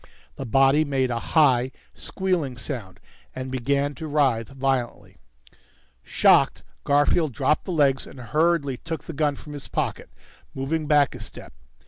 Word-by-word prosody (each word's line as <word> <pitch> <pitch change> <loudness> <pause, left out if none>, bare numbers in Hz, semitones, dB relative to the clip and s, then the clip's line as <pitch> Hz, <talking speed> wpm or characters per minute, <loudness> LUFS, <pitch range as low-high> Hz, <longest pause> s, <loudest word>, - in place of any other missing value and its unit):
The 135 - -6
body 135 +5 +4
made 135 -4 0
a 120 - -1
high, 130 -3 +3 0.2
squealing 175 -10 -2
sound 105 - -6 0.4
and 130 0 -5
began 140 +3 0
to 160 +2 -7
writhe 135 -7 +1
violently. 135 -2 -3 0.8
Shocked, - - +3 0.2
Garfield 145 +1 +2
dropped 135 +6 0
the - - -4
legs 140 -5 +2
and 135 - -12
hurriedly 145 +2 +1
took 160 +3 -6
the 165 - -8
gun 145 -1 0
from 150 +2 -11
his 145 -2 -7
pocket, - - -3 0.5
moving 150 +3 -2
back 145 -2 +3
a 125 - -9
step. 105 - -10
140 Hz, 145 wpm, -24 LUFS, 130-150 Hz, 0.8 s, body